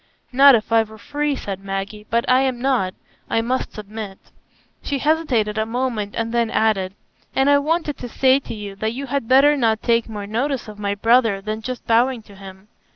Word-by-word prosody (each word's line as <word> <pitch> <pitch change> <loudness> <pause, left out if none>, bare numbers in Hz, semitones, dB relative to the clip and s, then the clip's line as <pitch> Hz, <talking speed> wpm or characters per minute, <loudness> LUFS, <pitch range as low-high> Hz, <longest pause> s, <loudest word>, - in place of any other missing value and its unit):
"Not 275 +1 +7
if 220 0 -2
I 225 0 +5
were 220 0 -8
free," 290 +5 -2
said 195 -5 -6
Maggie; 195 +2 -5
"but 235 +1 0
I 255 +1 +4
am 260 -2 -1
not, 245 -8 0 0.3
I 225 - +1
must 255 +3 -2
submit." 210 -2 -7 0.6
She 280 - -2
hesitated 260 -8 +1
a 220 - +1
moment, 230 -4 -2
and 230 0 -2
then 235 -1 +1
added, 195 -4 0 0.4
"And 270 +2 +3
I 285 - +5
wanted 310 0 -1
to 245 - -6
say 260 +3 +3
to 260 - -8
you, 205 -2 -7
that 220 +2 -2
you 275 +3 -5
had 275 -3 -2
better 275 +4 +5
not 225 -5 +1
take 235 -1 +1
more 205 -2 -6
notice 250 +5 -2
of 210 -1 -10
my 200 -1 -1
brother 225 -1 +3
than 215 +2 -5
just 255 +2 -6
bowing 235 +1 +2
to 205 -2 -16
him. 190 0 -12
230 Hz, 205 wpm, -21 LUFS, 210-260 Hz, 0.6 s, Not